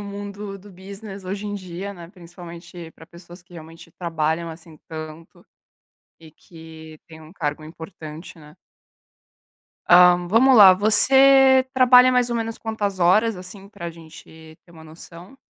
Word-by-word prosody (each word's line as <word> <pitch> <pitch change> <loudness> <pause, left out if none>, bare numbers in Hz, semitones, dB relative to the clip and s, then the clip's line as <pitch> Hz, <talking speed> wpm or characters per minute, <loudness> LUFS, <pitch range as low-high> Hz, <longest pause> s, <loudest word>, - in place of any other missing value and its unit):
no - - -8
mundo 200 0 -9
do 205 +2 -17
business, 195 +1 -12
hoje 200 +3 -6
em 205 - -6
dia, 190 +1 -8
né, 170 -3 -13
principalmente 175 -2 -13
pra 160 - -17
pessoas 175 +1 -16
que 175 - -25
realmente 165 0 -14
trabalham, 165 -1 -3
assim, 160 -1 -15
tanto 155 0 -11 0.8
e 160 -2 -17
que 160 -2 -15
têm 160 -1 -15
um 155 +1 -16
cargo 150 -3 -5
importante, 160 +1 -12
né. 150 0 -18 1.3
Ah, 180 0 +6
vamos 250 +5 +3
lá! 195 -3 +8
Você 265 +6 +4
trabalha 255 0 +5
mais 245 -1 0
ou 235 - -2
menos 225 0 -5
quantas 205 -4 -5
horas, 210 +6 +2
assim, 190 +2 -12
pra 170 -5 -9
gente 160 -1 -16
ter - - -24
uma 160 -2 -16
noção? 170 +7 -15
180 Hz, 150 wpm, -20 LUFS, 160-205 Hz, 1.3 s, lá